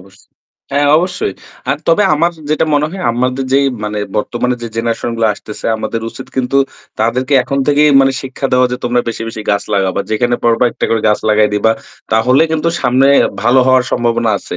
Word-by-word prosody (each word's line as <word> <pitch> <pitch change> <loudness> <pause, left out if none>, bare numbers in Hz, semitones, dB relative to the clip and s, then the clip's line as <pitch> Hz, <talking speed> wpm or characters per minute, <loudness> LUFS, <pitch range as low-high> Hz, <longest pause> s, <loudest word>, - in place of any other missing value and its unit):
অবশ্ 95 +1 -19 0.5
হ্যাঁ 145 +1 +2
অবশ্যই। 180 - -2 0.4
আর 135 - +1
তবে 165 +5 +4
আমার 170 +3 +1 0.2
যেটা 155 - +2
মনে 145 +1 +2
হয় 190 +1 -7
আমাদের 125 +2 -1
যে 135 - +5 0.3
মানে 105 0 -3 0.2
বর্তমানে 120 +3 -1
যে 115 - -4
জেনারেশন 115 +1 -2
গুলো 115 -1 +2
আসতেছে, 105 - -8
আমাদের 115 +1 -4
উচিত 130 - -10
কিন্তু 130 +1 0 0.4
তাদেরকে 130 +5 0
এখন 140 +2 -3
থেকেই 150 +1 +4
মানে 135 0 +3
শিক্ষা 135 +1 -4
দেওয়া 125 0 +4
যে - - -1
তোমরা 120 0 +1
বেশি, 115 - -4
বেশি 110 -1 -7
গাছ 100 0 +1
লাগাবা। 95 -2 0
যেখানে 120 +3 +1
পারবা 115 +1 +3
একটা - - -3
করে 115 - +1
গাছ 105 - +2
লাগায় 105 0 +3
দিবা। 110 +2 +2 0.4
তাহলে 125 +6 +3
কিন্তু 160 +1 0
সামনে 130 +2 +3 0.4
ভালো 130 +2 +4
হওয়ার 130 -1 +4
সম্ভাবনা 120 -1 +1
আছে। - - -7
125 Hz, 190 wpm, -14 LUFS, 115-135 Hz, 0.5 s, যে